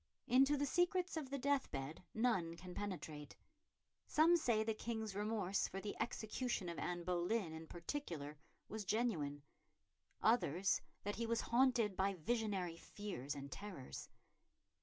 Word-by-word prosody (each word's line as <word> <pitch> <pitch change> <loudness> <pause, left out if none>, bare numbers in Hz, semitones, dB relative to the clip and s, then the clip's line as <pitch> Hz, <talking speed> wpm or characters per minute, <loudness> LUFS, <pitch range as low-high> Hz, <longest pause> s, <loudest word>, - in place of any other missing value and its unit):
Into 270 +3 +5
the 285 - +2
secrets 355 +4 +2
of 305 -5 -3
the 280 - -1
deathbed 175 - 0
none 190 -8 +2
can 180 0 -8
penetrate. 160 -8 -5 0.7
Some 325 +3 +6
say 235 -9 +3
the 220 0 +1
King's 220 -1 -3
remorse, 205 -2 +1
for 195 - -5
the 205 +1 -4
execution 225 -4 -1
of 170 - -4
Anne 175 -1 -2
Boleyn 180 +1 0
in 160 0 -7
particular, 170 - -4 0.3
was 220 0 -4
genuine; 180 -10 0 0.8
others 195 - +3 0.2
that 205 +1 -2
he 230 0 -1
was 230 0 +2
haunted 235 -4 +3
by 195 +1 +2
visionary 190 -2 0
fears 165 -8 -5
and 140 0 -6
terrors. 190 -9 -6
205 Hz, 140 wpm, -40 LUFS, 170-240 Hz, 0.8 s, Some